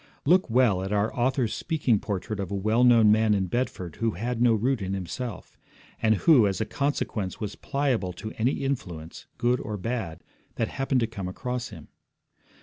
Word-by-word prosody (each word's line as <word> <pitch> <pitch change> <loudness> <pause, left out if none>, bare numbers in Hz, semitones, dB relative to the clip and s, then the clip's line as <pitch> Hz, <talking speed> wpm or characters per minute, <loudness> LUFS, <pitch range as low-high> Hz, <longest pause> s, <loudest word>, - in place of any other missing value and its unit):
Look 180 +1 +4
well 115 -6 +3
at 95 +1 -4
our 105 +1 +1
author's 125 -2 +1
speaking 145 - +1
portrait 100 +1 -4
of 95 -3 -3
a 100 - -3
well 110 +5 +2
known 115 -4 +6
man 110 0 +4
in 95 -1 +1
Bedford 95 -6 -3
who 115 -2 0
had 115 +5 -3
no 120 -2 +5
root 120 +2 0
in 95 0 -2
himself, 95 +4 -6 0.4
and 110 0 +4
who, 125 - +5
as 95 - -2
a 110 - 0
consequence, 110 -7 -2
was 105 -2 -4
pliable 130 -10 -1
to 110 +5 -7
any 125 +5 0
influence, 90 - -5
good 125 +1 +1
or 105 -1 -4
bad, 95 -6 -4 0.3
that - - -1
happened 135 -1 0
to - - +3
come 100 -5 -6
across 125 +6 -4
him. - - -11
110 Hz, 185 wpm, -26 LUFS, 100-125 Hz, 0.4 s, known